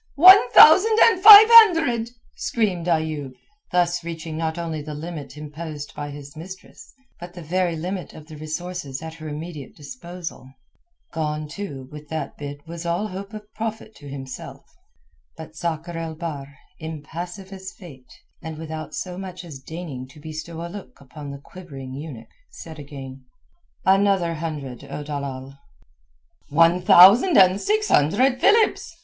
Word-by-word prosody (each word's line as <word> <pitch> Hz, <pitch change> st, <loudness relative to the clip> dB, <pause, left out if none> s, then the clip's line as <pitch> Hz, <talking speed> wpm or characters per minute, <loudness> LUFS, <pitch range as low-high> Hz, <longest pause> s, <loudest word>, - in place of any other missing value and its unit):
"One 365 Hz, -3 st, +8 dB
thousand 405 Hz, +8 st, +7 dB
and 375 Hz, -5 st, +4 dB
five 415 Hz, +1 st, +12 dB
hundred," 325 Hz, -, +6 dB, 0.3 s
screamed 190 Hz, -7 st, -2 dB
Ayoub, 155 Hz, -5 st, -2 dB, 0.4 s
thus 175 Hz, -1 st, 0 dB
reaching 165 Hz, -1 st, -7 dB
not 160 Hz, 0 st, -3 dB
only 165 Hz, -3 st, -4 dB
the 150 Hz, 0 st, -8 dB
limit 155 Hz, -2 st, -8 dB
imposed 150 Hz, 0 st, -8 dB
by 145 Hz, 0 st, -6 dB
his 145 Hz, 0 st, -11 dB
mistress, 185 Hz, +4 st, -12 dB, 0.3 s
but 175 Hz, +1 st, -11 dB
the 175 Hz, -, -9 dB
very 175 Hz, +1 st, -1 dB
limit 180 Hz, +3 st, -6 dB
of 155 Hz, -, -12 dB
the 155 Hz, 0 st, -12 dB
resources 155 Hz, -2 st, -6 dB
at 160 Hz, 0 st, -7 dB
her 155 Hz, -1 st, -9 dB
immediate 150 Hz, -2 st, -8 dB
disposal. 170 Hz, -, -9 dB, 0.6 s
Gone, 155 Hz, -2 st, -3 dB
too, 145 Hz, -6 st, -8 dB
with 150 Hz, -1 st, -11 dB
that 160 Hz, -1 st, -5 dB
bid 145 Hz, 0 st, -9 dB
was 165 Hz, 0 st, -8 dB
all 175 Hz, +5 st, -2 dB
hope 195 Hz, +2 st, -8 dB
of 210 Hz, 0 st, -12 dB
profit 220 Hz, 0 st, -6 dB
to 145 Hz, -2 st, -12 dB
himself. 135 Hz, -1 st, -9 dB, 0.7 s
But 160 Hz, 0 st, -11 dB
Sakr 170 Hz, +1 st, -4 dB
el 165 Hz, -1 st, -5 dB
Bahr, 145 Hz, -4 st, -7 dB, 0.2 s
impassive 170 Hz, +5 st, -8 dB
as 190 Hz, 0 st, -9 dB
Fate, 140 Hz, -9 st, -15 dB, 0.3 s
and 160 Hz, -2 st, -8 dB
without 155 Hz, -1 st, -7 dB
so 180 Hz, 0 st, -6 dB
much 185 Hz, -2 st, -8 dB
as 150 Hz, -5 st, -10 dB
deigning 145 Hz, -3 st, -8 dB
to 135 Hz, +3 st, -17 dB
bestow 160 Hz, +2 st, -7 dB
a -, -, -5 dB
look 195 Hz, +3 st, -11 dB
upon 145 Hz, +1 st, -11 dB
the 140 Hz, -, -7 dB
quivering 140 Hz, -4 st, -11 dB
eunuch, 135 Hz, -6 st, -9 dB, 0.2 s
said 160 Hz, -2 st, -11 dB
again— 135 Hz, -2 st, -10 dB, 0.6 s
"Another 195 Hz, -3 st, +2 dB
hundred, 150 Hz, -6 st, -6 dB
O 150 Hz, -, -7 dB
dalal." 140 Hz, -2 st, -7 dB, 0.9 s
"One 165 Hz, +4 st, +3 dB
thousand 195 Hz, -, +7 dB
and 190 Hz, 0 st, +5 dB
six 425 Hz, 0 st, 0 dB
hundred 250 Hz, -, +2 dB
philips!" 415 Hz, -6 st, +2 dB
165 Hz, 150 wpm, -22 LUFS, 150-185 Hz, 0.9 s, five